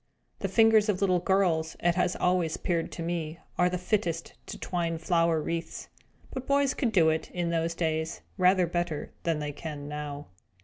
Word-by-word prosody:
The -, -, -1 dB
fingers 225 Hz, -1 st, +5 dB
of 190 Hz, -3 st, +1 dB
little 185 Hz, -3 st, +3 dB
girls, 175 Hz, -4 st, +1 dB
it 175 Hz, 0 st, +2 dB
has 180 Hz, 0 st, +1 dB
always 180 Hz, -3 st, +1 dB
appeared 170 Hz, -2 st, -1 dB
to 170 Hz, -, -5 dB
me, 165 Hz, -2 st, -3 dB, 0.2 s
are 180 Hz, 0 st, +5 dB
the 180 Hz, -, -2 dB
fittest 175 Hz, -3 st, -1 dB
to -, -, -6 dB
twine 170 Hz, -2 st, -2 dB
flower 165 Hz, -1 st, +2 dB
wreaths; 165 Hz, +1 st, -4 dB, 0.4 s
but 260 Hz, -1 st, -5 dB
boys 280 Hz, -1 st, +3 dB
could 245 Hz, -5 st, 0 dB
do 170 Hz, -6 st, +5 dB
it, 160 Hz, 0 st, -1 dB
in 175 Hz, -1 st, 0 dB
those 165 Hz, 0 st, 0 dB
days, 160 Hz, -1 st, -1 dB
rather 185 Hz, -1 st, +4 dB
better 175 Hz, -3 st, -2 dB
than 165 Hz, -2 st, +1 dB
they 150 Hz, -1 st, -3 dB
can 145 Hz, -1 st, -7 dB
now. 150 Hz, -1 st, -5 dB
170 Hz, 180 wpm, -28 LUFS, 160-185 Hz, 0.4 s, fingers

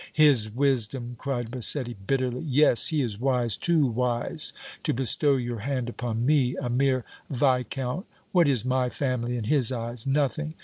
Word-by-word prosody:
"His 140 Hz, -8 st, +4 dB
wisdom!" 125 Hz, -1 st, 0 dB
cried 120 Hz, -4 st, -4 dB
Massetti, 125 Hz, 0 st, +2 dB
bitterly. 130 Hz, -2 st, -1 dB
"Yes, 145 Hz, -4 st, +4 dB
he 155 Hz, -3 st, 0 dB
is 110 Hz, -4 st, -4 dB
wise, 125 Hz, -4 st, +1 dB
too 165 Hz, -4 st, +2 dB
wise 120 Hz, -1 st, -1 dB, 0.3 s
to -, -, -1 dB
bestow 135 Hz, +3 st, +2 dB
your 120 Hz, -3 st, -3 dB
hand 125 Hz, +1 st, -3 dB
upon 120 Hz, -1 st, -3 dB
me, 135 Hz, -3 st, +2 dB
a 120 Hz, -, -3 dB
mere 130 Hz, -1 st, +1 dB, 0.2 s
Viscount! 130 Hz, -, -1 dB, 0.2 s
What 175 Hz, -4 st, +4 dB
is 125 Hz, -5 st, +2 dB
my 130 Hz, -1 st, +1 dB
family 125 Hz, -3 st, -2 dB
in 115 Hz, -, -3 dB
his 130 Hz, +1 st, +2 dB
eyes? 120 Hz, 0 st, -4 dB
Nothing. 150 Hz, +3 st, -1 dB
125 Hz, 160 wpm, -26 LUFS, 120-140 Hz, 0.3 s, His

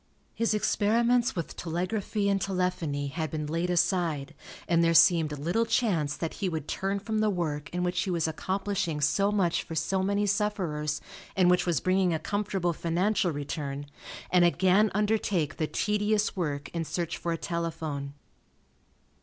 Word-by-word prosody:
His 230 Hz, -2 st, +1 dB
experiments 235 Hz, +4 st, +2 dB
with 170 Hz, -3 st, -4 dB
telegraphy 190 Hz, +5 st, -2 dB
and 195 Hz, -1 st, +1 dB
telephony 180 Hz, -7 st, -1 dB
had 160 Hz, +2 st, -3 dB
been 150 Hz, +1 st, -3 dB
laid 165 Hz, +4 st, -1 dB
aside, 170 Hz, -5 st, +1 dB, 0.3 s
and 170 Hz, -1 st, +3 dB
there 165 Hz, 0 st, +3 dB
seemed 160 Hz, -4 st, +5 dB
little 175 Hz, +11 st, +1 dB
chance 175 Hz, -11 st, +1 dB
that 165 Hz, -, -3 dB
he 190 Hz, -, +1 dB
would 160 Hz, -3 st, -4 dB
turn 195 Hz, +1 st, -1 dB
from 215 Hz, +2 st, -2 dB
the 215 Hz, 0 st, +3 dB
work 155 Hz, -6 st, -2 dB
in 180 Hz, 0 st, -2 dB
which 180 Hz, -1 st, 0 dB
he 190 Hz, -, -2 dB
was 170 Hz, -3 st, 0 dB
accomplishing 185 Hz, -1 st, -2 dB
so 195 Hz, +8 st, +2 dB
much 185 Hz, -5 st, +1 dB
for 165 Hz, -, -8 dB
so 190 Hz, +4 st, 0 dB
many 200 Hz, +2 st, +1 dB
sufferers, 190 Hz, -8 st, -1 dB, 0.3 s
and 180 Hz, -2 st, +5 dB
which 180 Hz, 0 st, +2 dB
was 165 Hz, -6 st, +2 dB
bringing 185 Hz, 0 st, +2 dB
a -, -, +1 dB
comfortable 195 Hz, -1 st, -1 dB
financial 175 Hz, +4 st, +1 dB
return, 145 Hz, -1 st, -4 dB, 0.5 s
and 180 Hz, -1 st, +5 dB
again 185 Hz, +4 st, +4 dB
undertake 205 Hz, -7 st, 0 dB
the 155 Hz, -, 0 dB
tedious 210 Hz, +2 st, 0 dB
work 145 Hz, -6 st, -3 dB
in 170 Hz, -1 st, -3 dB
search 170 Hz, +1 st, -3 dB
for 170 Hz, -, -3 dB
a 165 Hz, -, -1 dB
telephone. 160 Hz, -5 st, -4 dB
175 Hz, 160 wpm, -28 LUFS, 160-200 Hz, 0.5 s, seemed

